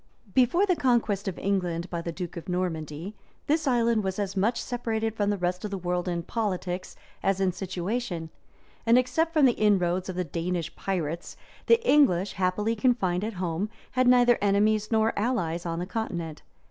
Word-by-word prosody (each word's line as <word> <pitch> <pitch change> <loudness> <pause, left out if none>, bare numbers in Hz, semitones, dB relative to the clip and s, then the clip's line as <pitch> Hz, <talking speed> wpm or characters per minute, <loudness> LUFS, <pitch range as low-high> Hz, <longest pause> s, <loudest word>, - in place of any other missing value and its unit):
Before 265 - +4
the 365 -3 +2
conquest 230 - +1
of 190 - -3
England 180 -3 -1
by 170 -1 -2
the 170 - -4
duke 175 0 -6
of 170 +2 -7
Normandy, 170 0 -3 0.3
this 310 0 +1
island 235 -3 +2
was 190 -1 -2
as 200 -1 -2
much 215 +5 +1
separated 225 -3 -2
from 205 -2 0
the 205 - 0
rest 180 +1 -2
of 210 - -3
the 200 - -3
world 180 0 -2
in 170 -1 -1
politics 185 -4 -3 0.3
as 195 0 +1
in 190 -1 +2
situation; 180 -1 -3 0.5
and 230 +2 +5
except 255 +7 +1
from 305 -4 +4
the 255 - +6
inroads 185 -5 +1
of 185 - -4
the 180 - 0
Danish 170 +1 -3
pirates, 170 -4 -3 0.3
the 465 +1 +4
English, 205 -11 +4
happily 200 +4 0
confined 205 -6 +1
at 225 +1 -3
home, 180 +2 -2 0.2
had 255 0 +2
neither 245 -1 +5
enemies 210 +2 +2
nor 220 0 +3
allies 180 -7 -1
on 165 0 -2
the 175 - -2
continent. 175 -7 -4
195 Hz, 180 wpm, -27 LUFS, 175-230 Hz, 0.5 s, the